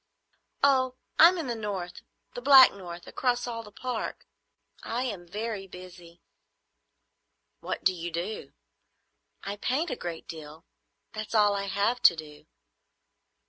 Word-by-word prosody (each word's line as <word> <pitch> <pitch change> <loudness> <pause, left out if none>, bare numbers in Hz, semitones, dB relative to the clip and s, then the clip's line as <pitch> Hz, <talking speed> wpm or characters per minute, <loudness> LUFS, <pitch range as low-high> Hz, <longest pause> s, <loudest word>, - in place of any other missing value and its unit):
"Oh, 260 -2 +3 0.2
I'm 345 +3 +8
in 330 - -3
the 245 - -2
north,—the 205 +1 -7
black 265 0 +8
north, 175 -3 -9
across 245 -1 -1
all 230 -2 -4
the 210 -2 -13
Park. 250 +1 -5 0.6
I 240 +2 -2
am 195 -9 -5
very 210 +1 -4
busy." 180 -2 -13 1.4
"What - - -5
do 185 - +4
you 175 -1 -5
do?" 175 +6 -5 0.9
"I 200 +1 -5
paint 285 +10 -1
a - - -1
great 170 -7 -7
deal. 155 -1 -10 0.5
That's 215 +1 -5
all 210 -1 +5
I 200 0 -2
have 200 +5 0
to 170 - +7
do." 150 -1 -11
205 Hz, 135 wpm, -28 LUFS, 175-245 Hz, 1.4 s, I'm